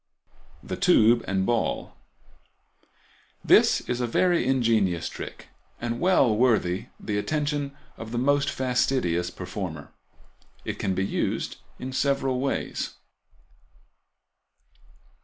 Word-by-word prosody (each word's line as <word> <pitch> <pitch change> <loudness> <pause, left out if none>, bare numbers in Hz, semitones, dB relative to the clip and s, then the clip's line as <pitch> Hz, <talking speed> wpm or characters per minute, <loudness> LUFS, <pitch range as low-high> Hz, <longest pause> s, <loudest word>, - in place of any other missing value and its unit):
The 65 - -5
Tube 115 +2 +5
and 95 -1 0 2.0
Ball.—This - - +5
is 125 0 -3
a 120 - 0
very 175 +2 +2
ingenious 115 -9 +2
trick, - - -8 0.3
and 120 0 -3
well 140 - +4
worthy 110 -3 +2
the 105 -1 -2
attention 145 +2 -2 0.2
of 115 -1 -8
the 120 - -2
most 140 +3 +2
fastidious 125 -9 0
performer. 90 -4 -6 0.7
It - - -4
can 95 - -1
be 95 - 0
used - - -2 0.2
in 130 +1 -6
several 135 -1 +1
ways. 135 +1 -2
120 Hz, 100 wpm, -26 LUFS, 95-135 Hz, 2.0 s, Tube